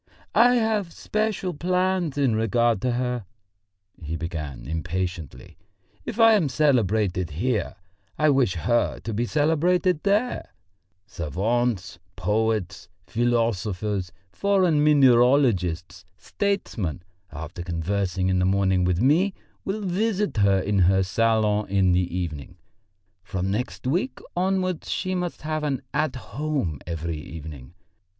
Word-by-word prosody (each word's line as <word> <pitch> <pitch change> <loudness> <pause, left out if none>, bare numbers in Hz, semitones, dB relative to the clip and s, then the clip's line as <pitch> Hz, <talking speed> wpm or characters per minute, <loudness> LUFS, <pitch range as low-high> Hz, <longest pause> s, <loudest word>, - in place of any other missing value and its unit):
"I 245 +1 +6
have 220 -6 0
special 215 -3 -2
plans 180 -1 0
in 135 -6 +2
regard 115 -1 +1
to 125 -1 0
her," 125 -2 -2 0.8
he 80 0 -4
began 80 -6 -5
impatiently. 80 -2 -4 0.5
"If 235 -1 -5
I 225 0 +7
am 180 -9 +2
celebrated 110 - +1
here, 105 - -1 0.4
I 155 -1 +4
wish 130 -9 +2
her 120 +8 +1
to 115 - -5
be 120 +3 -1
celebrated 160 +3 +2
there. 210 +5 0 0.5
Savants, 100 - -2 0.2
poets, 95 -2 -1 0.2
philosophers, 105 -5 -1 0.2
foreign 185 - +2
mineralogists, 120 - +3
statesmen, 105 - -2 0.3
after 80 +2 -7
conversing 90 +2 -1
in 95 -1 +2
the 90 - +2
morning 95 -1 +2
with 90 -1 +1
me, 170 +10 +3 0.3
will 205 +3 -3
visit 200 - -1
her 95 -1 +3
salon 105 +1 +1
in 95 -2 +3
the 90 0 0
evening. 85 0 -5 0.6
From 95 0 -3
next 125 +5 -3
week 180 - 0 0.2
onwards 185 -1 -1
she 185 0 -1
must 180 -3 -3
have 155 0 -2
an 140 -3 -2
'At 150 -2 0
Home' 135 - -3
every 85 -1 -3
evening. 75 -1 -9
110 Hz, 115 wpm, -24 LUFS, -, 0.8 s, I